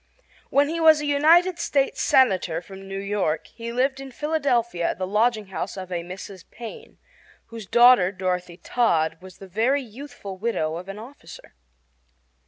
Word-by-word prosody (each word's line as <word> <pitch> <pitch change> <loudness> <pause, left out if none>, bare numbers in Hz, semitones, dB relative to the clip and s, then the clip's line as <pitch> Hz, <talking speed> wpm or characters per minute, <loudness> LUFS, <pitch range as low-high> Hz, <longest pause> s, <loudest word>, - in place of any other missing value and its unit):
When 285 +1 +3
he 330 +2 -3
was 315 -2 +5
United 330 +5 +4
States 275 -5 0
Senator 185 -10 +3
from 195 +2 -12
New 195 0 -5
York 195 -5 -1
he 230 0 -8
lived 265 +3 0
in 270 0 -8
Philadelphia 250 - 0
at - - -3
the 185 - -2
lodging 215 +1 +1
house 190 0 -5
of 185 -1 -7
a 175 -1 -2
Mrs. 185 +1 -9
Payne, 245 - -10 0.5
whose 225 -3 -9
daughter, 240 -6 +6
Dorothy 180 -2 -3
Todd, 165 -9 0
was 185 -1 -13
the 195 - -11
very 235 +9 +1
youthful 225 -5 -9
widow 165 -8 -1
of 180 +3 -9
an 195 - -6
officer. 220 - -12
215 Hz, 160 wpm, -24 LUFS, 185-270 Hz, 0.5 s, daughter